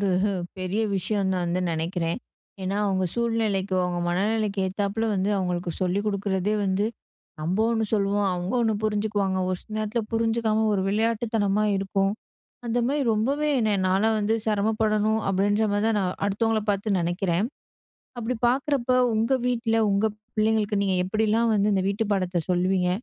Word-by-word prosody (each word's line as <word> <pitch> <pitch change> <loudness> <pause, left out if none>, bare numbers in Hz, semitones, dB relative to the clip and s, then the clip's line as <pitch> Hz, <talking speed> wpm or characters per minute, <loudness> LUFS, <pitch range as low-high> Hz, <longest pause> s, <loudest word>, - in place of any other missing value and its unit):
ஒரு 200 -2 +1 0.5
பெரிய 185 +4 -1 0.2
விஷயம்னு 190 0 0
நான் 175 - -1
வந்து 175 +2 0
நெனைக்கிறேன். 165 +2 -2 0.4
ஏன்னா, 190 +2 -1
அவங்க 190 -1 +1
சூழ்நிலைக்கு, 220 -5 0
அவங்க 175 -1 -2
மனநிலைக்கு 205 +3 0
ஏத்தாப்ல 200 +3 -2
வந்து 195 +2 0
அவங்களுக்கு 180 -1 -2
சொல்லி 185 +2 +1
குடுக்குறதே 200 0 0
வந்து, 195 +1 +1 0.6
நம்ப 170 +6 -1
ஒண்ணு 225 -1 +1
சொல்லுவோம் 200 -1 +1
அவங்க 180 +1 -3
ஒண்ணு 220 -2 +2
புரிஞ்சுக்குவாங்க. 205 -3 0
ஒரு 185 - 0
சில 215 - -10
நேரத்ல 215 +2 -1
புரிஞ்சுக்காம 225 -1 +1
ஒரு 190 - 0
விளையாட்டுத்தனமா 215 -1 +1
இருக்கும். 195 0 0 0.5
அந்த 235 +1 0
மாரி 285 +1 0
ரொம்பவே 275 +8 0
என்ன 220 -1 +1 0.2
நான்லாம் 215 +4 +2
வந்து 210 +2 +1
செரமப்படணும் 215 0 +1
அப்டின்ற 205 +3 +2
மாதிரி 205 +1 +1
தான் 220 -2 +1
நான் 185 -1 -2
அடுத்தவங்கள 220 +2 +1
பார்த்து 200 0 0
நெனைக்கிறேன். 175 +3 0 0.7
அப்டி 240 +2 -2
பார்க்குறப்போ, 260 -1 +1 0.2
உங்க 225 +4 +1
வீட்ல 235 -2 +1
உங்க 200 +2 +2 0.3
பிள்ளைங்களுக்கு 215 -1 +1
நீங்க 190 -2 +1
எப்டிலாம் 220 +3 +1
வந்து 210 0 +2
இந்த 190 - +1
வீட்டு 205 +3 0
பாடத்த 185 -3 0
சொல்லுவீங்க? 180 0 +2
205 Hz, 150 wpm, -25 LUFS, 190-220 Hz, 0.7 s, ஒண்ணு